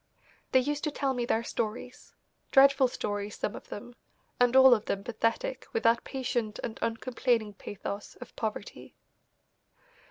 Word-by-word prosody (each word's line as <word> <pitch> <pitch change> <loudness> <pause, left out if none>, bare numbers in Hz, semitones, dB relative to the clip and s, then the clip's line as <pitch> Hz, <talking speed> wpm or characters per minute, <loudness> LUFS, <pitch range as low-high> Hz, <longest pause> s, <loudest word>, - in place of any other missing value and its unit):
They 260 - +6
used 290 +2 -2
to - - +1
tell 275 -2 -1
me 245 -2 -1
their 230 -1 +1
stories, 235 +2 -5 0.3
dreadful 275 0 +6
stories 205 -3 -4
some - - -2
of - - -11
them, 240 +4 -8 0.5
and 245 0 +4
all 265 -1 +9
of 215 -2 0
them 195 - -2
pathetic 240 - -2
with 455 - -1
that 230 +1 +4
patient 240 -5 -2
and 225 - -5
uncomplaining 230 -2 0
pathos 200 +1 -7
of 250 - -12
poverty. 215 -2 -5
240 Hz, 150 wpm, -29 LUFS, 215-265 Hz, 0.5 s, all